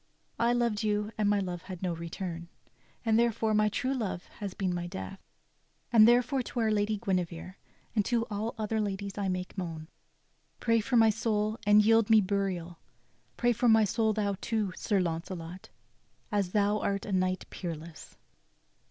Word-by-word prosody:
I 235 +1 +3
loved 235 -3 +1
you, 210 0 0
and 210 -1 +1
my 205 - +3
love 180 -3 -4
had 185 0 -8
no 180 -2 0
return, 170 +1 -6 0.6
And 225 0 +4
therefore 230 -2 +1
my 215 0 +3
true 260 +5 -1
love 210 -8 -3
has 200 -3 -5
been 185 -2 -1
my 175 0 -3
death. 95 - -7 0.7
And 220 -1 +8
therefore 250 +3 +3
to 245 - -5
our 220 -1 +2
lady 210 0 +1
Guinevere, 185 -4 -2 0.4
And 210 - +3
to 235 -1 +1
all 215 +3 -3
other 220 0 -1
ladies 200 -1 -3
I 200 - -1
make 185 0 -3
moan. 165 -3 -6 0.7
Pray 230 -1 +2
for 240 +3 +1
my 225 -1 +6
soul, 215 0 -1
and 210 0 +6
yield 225 0 +4
me 220 -1 +7
burial. 185 -4 -2 0.6
Pray 240 -1 +3
for 240 +2 +2
my 220 0 +6
soul 220 +1 +1
thou 205 -2 -1
too. 215 -5 -1
Sir 205 -3 0
Launcelot, 170 +1 -4 0.6
As 200 -3 0
thou 210 0 +2
art 200 -1 -1
a - - -5
knight 185 -1 0
peerless." 165 -2 -7
205 Hz, 170 wpm, -30 LUFS, 185-220 Hz, 0.7 s, And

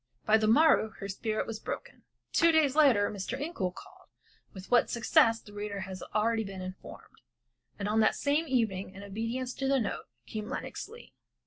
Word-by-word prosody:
By 220 +1 +5
the 215 - +1
morrow 260 -1 +5
her 195 - -6
spirit 215 +2 -2
was 225 -1 -5
broken. - - -7 0.3
Two 335 0 +5
days 305 -4 +3
later 255 -10 +4
Mr. 210 +6 -4
Incoul 240 - -3
called - - -14 0.4
with 190 -2 -11
what 245 - +4
success 230 -1 +3
the 205 - -15
reader 205 -1 -4
has 190 0 -6
been - - -9
already 220 -1 +1
informed, 185 -1 -10 0.6
and 200 - -3
on 215 +1 +2
that 215 - +4
same 300 +3 0
evening 210 -7 -1
in 200 - -9
obedience 230 +5 -3
to 270 - -3
the 275 0 +3
note, 215 - -3 0.2
came 215 - -6
Lenox - - -5
Leigh. 465 +2 -14
220 Hz, 185 wpm, -30 LUFS, 200-260 Hz, 0.6 s, By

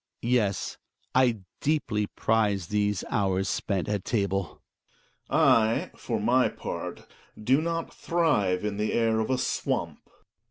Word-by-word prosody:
Yes, 115 -5 0 0.3
I 125 -5 +3 0.2
deeply 115 -9 0
prize 105 -6 0
these 105 -2 0
hours 95 -1 +1
spent 95 -3 -1
at 105 -2 -1
table. 100 -5 -1 0.7
Gregers. - - +3
I, 110 0 +3
for - - -3
m - - -3
y - - +4
part, - - -6 0.3
do 130 +7 +3
not 165 0 -3
thrive 115 - +1
in 105 -1 -2
the 105 +1 -1
air 115 -1 +2
of 110 - -1
a 130 - +2
swamp. - - -2
105 Hz, 135 wpm, -27 LUFS, 100-125 Hz, 0.7 s, y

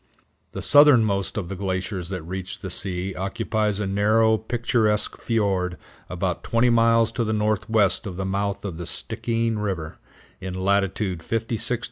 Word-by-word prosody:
The - - -5
southernmost 115 -11 +5
of 95 -5 -3
the 100 - -5
glaciers 95 -1 -3
that 90 -4 -4
reach 95 +2 -6
the 95 -2 -5
sea 95 0 -2
occupies 105 +2 -1
a 105 - -1
narrow, 110 +3 +3
picturesque 110 -1 0
fiord 95 -6 0 0.3
about 90 0 -2
twenty 120 +1 +2
miles 115 -1 +4
to 120 - -1
the 110 -1 -1
northwest 105 0 +1
of 95 - -6
the 95 +1 -3
mouth 100 +1 -2
of 90 -5 -5
the 85 -1 -6
Stikeen 115 -2 -1
River, 90 -7 -4 0.4
in 95 -1 -5
latitude 95 -1 0
56° - - -15
50′. 115 +3 -2
100 Hz, 155 wpm, -24 LUFS, 95-110 Hz, 0.4 s, southernmost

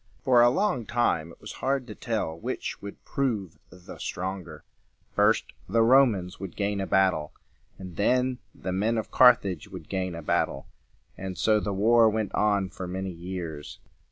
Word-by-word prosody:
For 125 -4 +5
a 120 - +7
long 130 - 0
time 115 -9 0
it - - -16
was - - -9
hard 135 -1 0
to 110 - -8
tell 110 -9 -3
which - - -4
would 100 0 -10
prove 110 - -2
the 90 -1 -12
stronger. 95 -1 -5 0.5
First - - +2 0.2
the 115 +3 +3
Romans 115 -7 +3
would 95 -2 -7
gain 100 -1 -1
a 95 - -3
battle, 95 -6 +2 0.4
and 90 -3 -9
then 125 +4 +1 0.2
the 95 - -5
men 105 +5 0
of 110 - -4
Car 125 -1 +8
thage 95 -5 -6
would 90 -6 -10
gain 95 -3 -2
a 85 - -7
battle; - - 0 0.5
and 95 -2 -5
so 110 +3 +3
the 105 - -3
war 110 +3 +5
went 110 -2 -2
on 100 -3 +1
for 95 -1 -6
many 95 +1 -4
years. 85 -4 -6
100 Hz, 175 wpm, -27 LUFS, 90-115 Hz, 0.5 s, Car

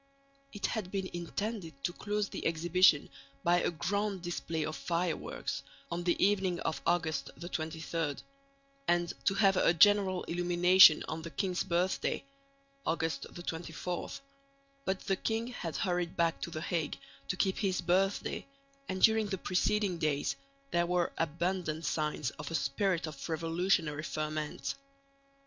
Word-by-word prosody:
It 205 - -3
had 215 -6 -2
been 195 -1 -2
intended 175 -3 -4
to 175 - 0
close 210 +1 -1
the - - -3
exhibition 165 -1 +4 0.4
by 175 +1 +4
a - - +1
grand 190 +3 -1
display 165 -2 -2
of 155 - -4
fireworks 170 0 -2 0.3
on 175 +1 -2
the 175 - +2
evening 190 -3 +2
of 155 -3 -2
August 170 -2 +1
23, 160 -2 -3 0.7
and 175 0 +2
to 195 - +3
have 195 -3 +4
a 170 - +4
general 195 +1 +5
illumination 175 -1 +6
on 160 +1 -4
the 165 - -6
king's 180 +4 -1
birthday 180 +9 0 0.6
(August 160 -4 -1
24). 175 0 -4 0.8
But 190 0 -1
the 195 - 0
king 225 +3 -1
had 170 -10 -5
hurried 175 -2 -1
back 165 -1 +1
to - - -3
the 160 -2 -5
Hague 165 -2 -1 0.3
to 180 - -2
keep 190 0 +1
his 195 -3 +1
birthday, 190 +8 +1 0.4
and 185 0 -2
during 220 -1 +6
the 195 -1 -2
preceding 185 0 +1
days 150 -3 0 0.4
there 175 0 +2
were 175 -1 +1
abundant 165 0 -1
signs 150 -2 -1
of 150 - -5
a 165 - -2
spirit 175 +5 +1
of 155 0 -7
revolutionary 165 -1 +1
ferment. 155 -2 -3
175 Hz, 140 wpm, -32 LUFS, 160-190 Hz, 0.8 s, illumination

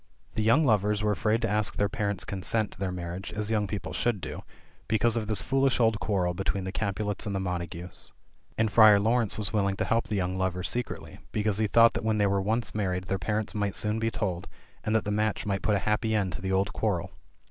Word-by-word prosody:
The - - -1
young 115 +9 +4
lovers 105 -2 +2
were 105 - +2
afraid 110 +3 +1
to - - +2
ask 105 0 +1
their 100 - +2
parents' 100 -3 -2
consent 100 +3 -1
to - - -14
their 95 -1 -1
marriage, 90 +1 -5
as 105 +1 -2
young 105 -2 +1
people 100 +1 -5
should 120 -4 0
do, - - -6 0.5
because 110 +1 +2
of 110 -3 -1
this 105 -5 0
foolish 135 +6 +2
old 110 -2 +3
quarrel 90 -4 0
between 95 +1 -2
the 95 - -4
Capulets 105 0 -2
and 100 - -2
the - - 0
Montagues. 90 -1 -4 0.5
And 110 -1 +1
Friar 110 -2 +8
Laurence 115 +1 +1
was 105 -1 -3
willing 100 -2 +1
to - - -1
help 115 0 +1
the 105 - -2
young 90 -1 -1
lovers 90 -1 -1
secretly, 125 0 -4
because 105 -1 0
he 110 - +2
thought 115 +2 +6
that 115 - -3
when 110 -1 +1
they 105 - +3
were 100 0 +1
once 110 +3 0
married 90 -3 -1
their 95 +1 -2
parents 105 +4 -2
might 100 -2 -1
soon 105 +1 0
be 115 0 +1
told, 95 -5 -3 0.4
and 110 - 0
that 110 - +1
the 105 - -1
match 105 0 0
might 95 -2 -1
put 105 - +2
a 95 -3 -2
happy 110 +1 +1
end 95 -4 0
to 90 - -6
the 95 0 -2
old 95 +1 +1
quarrel. - - -1
105 Hz, 235 wpm, -28 LUFS, 95-110 Hz, 0.5 s, Friar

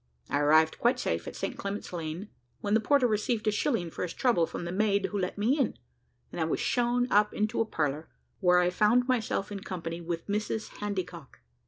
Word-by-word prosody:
I 145 - +2
arrived 155 +2 +4
quite 250 +2 +2
safe - - -2
at - - -6
St. - - -4
Clement's 200 -1 -5
Lane, 170 +4 -5 0.3
when 205 0 -1
the 220 - +5
porter 270 +4 +3
received 215 0 0
a - - +5
shilling 210 - 0
for - - -7
his 180 - -3
trouble 205 -11 +2
from - - -6
the 170 - -3
maid 200 +1 +2
who 205 - -1
let 185 +1 -2
me 240 +9 +2
in, 270 - 0 0.5
and - - -4
I - - +2
was - - -1
shown 245 0 +1
up 210 +1 +3
into 215 +2 0
a - - +2
parlour, 150 -5 -2 0.3
where 180 -2 +4
I 180 0 +3
found 225 +6 +3
myself 220 -5 0
in 200 - -4
company 170 -3 -5
with 170 0 -4
Mrs 210 +1 -2
Handycock. 180 -7 -5
205 Hz, 210 wpm, -29 LUFS, 175-220 Hz, 0.5 s, the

